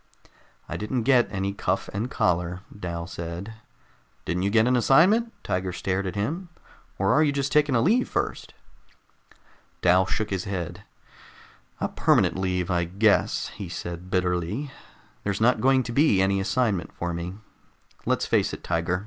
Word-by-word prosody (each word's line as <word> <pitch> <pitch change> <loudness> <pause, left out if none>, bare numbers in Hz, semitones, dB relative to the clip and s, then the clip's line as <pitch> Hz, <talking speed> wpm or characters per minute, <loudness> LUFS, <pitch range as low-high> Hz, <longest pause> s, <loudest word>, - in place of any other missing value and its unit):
"I - - -4
didn't 115 +3 -2
get 125 -1 +4
any 95 0 -2
cuff - - -1
and 110 +5 -2
collar," 90 -2 0
Dal 85 -4 -5
said. 85 +6 -6 0.7
"Didn't 90 - -1
you 100 - +1
get 110 +1 +4
an 125 +1 +3
assignment?" 185 - +4
Tiger 90 0 -1
stared 95 +1 -2
at 95 - -4
him. 165 - -3 0.5
"Or 95 +1 +2
are 155 - +4
you 150 -2 +3
just 140 -1 -1
taking 150 -3 +3
a 115 - +3
leave 230 - +2
first?" - - -3 1.3
Dal 90 +1 +4
shook 105 +1 -2
his 95 -2 -2
head. 90 -1 -4 1.0
"A - - 0
permanent - - +2
leave, 90 -1 -1
I 85 -1 +2
guess," 100 +5 +2
he 100 -4 -8
said 85 +1 -6
bitterly. 90 - -1 0.5
"There's 100 -1 -1
not 115 0 +3
going 130 +1 +4
to 120 - -5
be 140 -6 +4
any 95 +1 +2
assignment 100 - 0
for 85 0 -4
me. 85 +2 -5 0.7
Let's - - +1
face - - +1
it, - - -7
Tiger. 85 +2 0
100 Hz, 160 wpm, -25 LUFS, 90-125 Hz, 1.3 s, get